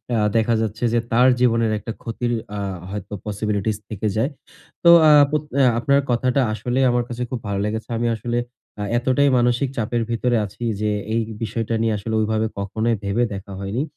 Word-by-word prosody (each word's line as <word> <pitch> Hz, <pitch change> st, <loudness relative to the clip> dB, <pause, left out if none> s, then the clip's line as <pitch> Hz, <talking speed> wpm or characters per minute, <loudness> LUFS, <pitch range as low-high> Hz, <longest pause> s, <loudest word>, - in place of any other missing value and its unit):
আ -, -, +2 dB, 0.2 s
দেখা 115 Hz, +1 st, +3 dB
যাচ্ছে 110 Hz, +2 st, -3 dB
যে, 120 Hz, -, +3 dB
তার 125 Hz, +3 st, +5 dB
জীবনের 115 Hz, -2 st, +2 dB
একটা 115 Hz, -, -6 dB
ক্ষতির 120 Hz, +1 st, -2 dB, 0.2 s
আ -, -, -3 dB, 0.3 s
হয়তো 100 Hz, 0 st, -6 dB
পসিবিলিটিস 105 Hz, 0 st, -1 dB
থেকে 110 Hz, 0 st, -3 dB
যায়। 115 Hz, +6 st, +1 dB, 0.5 s
তো 170 Hz, -, +7 dB, 0.2 s
আ -, -, +8 dB, 0.2 s
পোত 150 Hz, -1 st, 0 dB, 0.2 s
আ -, -, +5 dB, 0.2 s
আপনার 140 Hz, +4 st, +3 dB
কথাটা 125 Hz, +3 st, +2 dB
আসলেই 125 Hz, +5 st, 0 dB
আমার 120 Hz, 0 st, +1 dB
কাছে 120 Hz, 0 st, -5 dB
খুব 125 Hz, -, -3 dB
ভালো 100 Hz, -1 st, -1 dB
লেগেছে। 110 Hz, +1 st, -4 dB
আমি 120 Hz, +1 st, 0 dB
আসলে 120 Hz, +2 st, -3 dB, 0.4 s
আ -, -, -1 dB
এতটাই 130 Hz, +3 st, +2 dB
মানসিক 120 Hz, +2 st, +2 dB
চাপের 120 Hz, +1 st, 0 dB
ভিতরে 120 Hz, +1 st, +1 dB
আছি 105 Hz, +4 st, -9 dB, 0.2 s
যে, 105 Hz, 0 st, +1 dB, 0.2 s
এই 115 Hz, -, +2 dB, 0.2 s
বিষয়টা 115 Hz, +1 st, -2 dB
নিয়ে 115 Hz, -1 st, +1 dB
আসলে 110 Hz, +3 st, -5 dB
ঐভাবে 110 Hz, 0 st, +1 dB
কখনোই 110 Hz, +4 st, -1 dB
ভেবে 100 Hz, +5 st, +1 dB
দেখা 100 Hz, 0 st, -8 dB
হয়নি। 100 Hz, +7 st, -2 dB
115 Hz, 185 wpm, -21 LUFS, 105-120 Hz, 0.5 s, আ